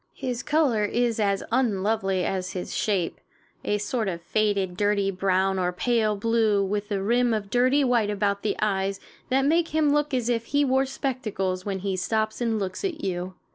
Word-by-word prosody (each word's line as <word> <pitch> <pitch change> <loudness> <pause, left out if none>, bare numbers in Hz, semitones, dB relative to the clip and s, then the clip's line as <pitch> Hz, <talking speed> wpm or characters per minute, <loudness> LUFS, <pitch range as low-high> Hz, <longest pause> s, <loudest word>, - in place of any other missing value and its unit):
His 250 -2 -3
color 285 -9 +2
is 230 +2 0
as 200 -2 +1
unlovely 200 -5 +1
as 185 -1 -2
his 180 -2 -5
shape 195 -5 -1 0.4
a 210 - 0
sort 220 +1 -2
of 175 -3 -2
faded, 200 -2 0
dirty 205 0 +1
brown 190 0 +1
or 180 -1 +1
pale 215 +2 +1
blue, 215 -1 +2
with 205 +1 -3
a 195 -1 -1
rim 240 +2 +2
of 205 -2 -5
dirty 255 +4 +3
white 240 -5 +2
about 200 -1 0
the 215 - -1
eyes 195 -2 0 0.3
that 270 +1 +2
makes 330 +3 +2
him 310 -2 +2
look 295 0 +1
as 250 -3 0
if 230 -1 0
he 285 +4 +2
wore 265 0 +2
spectacles 210 -9 -3
when 195 -1 -1
he 195 -1 -1
stops 215 +4 -1
and 230 -2 +1
looks 195 - -4
at 345 -6 -3
you. 185 0 -3
210 Hz, 185 wpm, -25 LUFS, 195-245 Hz, 0.4 s, dirty